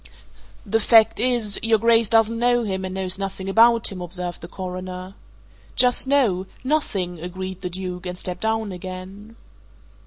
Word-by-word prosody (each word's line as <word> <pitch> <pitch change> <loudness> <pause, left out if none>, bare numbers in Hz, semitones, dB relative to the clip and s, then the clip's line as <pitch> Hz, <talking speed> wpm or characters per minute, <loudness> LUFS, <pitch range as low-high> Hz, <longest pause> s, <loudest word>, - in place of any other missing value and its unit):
"The 225 +2 +1
fact 225 0 +4
is, 235 -4 +2
your 225 0 +3
Grace 230 0 +3
doesn't 225 0 +3
know 240 0 +2
him 190 -3 -3
and 185 0 -6
knows 190 0 -1
nothing 195 -1 -5
about 230 +3 +4
him," 185 -2 -7
observed 175 0 -5
the 170 - -8
Coroner. 185 0 -7 0.6
"Just 250 +1 +5
so 210 -10 +2 0.2
nothing!" 200 - -2
agreed 185 +2 -7
the 180 - -4
Duke 180 0 -5
and 180 0 -5
stepped 180 0 -6
down 220 -1 -1
again. 185 +4 -9
195 Hz, 155 wpm, -22 LUFS, 185-225 Hz, 0.6 s, Just